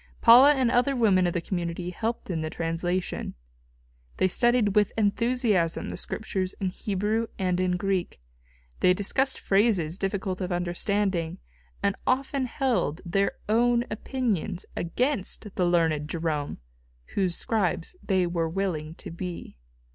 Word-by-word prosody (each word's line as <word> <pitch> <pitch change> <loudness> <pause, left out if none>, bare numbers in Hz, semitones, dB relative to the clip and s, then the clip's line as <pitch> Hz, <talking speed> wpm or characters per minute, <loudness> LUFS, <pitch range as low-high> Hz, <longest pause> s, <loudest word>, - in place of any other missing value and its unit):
Paula 255 +5 +8
and 255 -3 +2
other 250 +3 +2
women 195 -7 +4
of 175 - -1
the 170 - -1
community 175 0 -3
helped 225 +1 -3
in 165 -2 -2
the 155 - -2
translation. 175 +2 -2 0.8
They 185 - +3
studied 240 -1 +2
with 210 -1 +4
enthusiasm 215 -5 +1
the - - -5
Scriptures 190 -3 -3
in 190 -2 0
Hebrew 210 +4 -1
and 180 -1 0
in 180 -1 +1
Greek; 190 - -2 0.6
they 180 0 +4
discussed 260 +7 +1
phrases 195 -5 +2
difficult 195 -1 -2
of 185 0 -2
understanding, 175 0 -1 0.5
and 200 -1 +2
often 265 0 +1
held 225 - 0
their 195 +3 +1
own 235 +2 +3
opinions 215 - -2
against 210 - -1
the 180 - +1
learned 160 -4 +1
Jerome 160 -3 -2 0.6
whose 185 -3 0
scribes 205 - -1
they 190 -3 +1
were 170 -2 -1
willing 165 -4 -2
to - - -9
be. 175 +1 -6
190 Hz, 135 wpm, -27 LUFS, 175-225 Hz, 0.8 s, Paula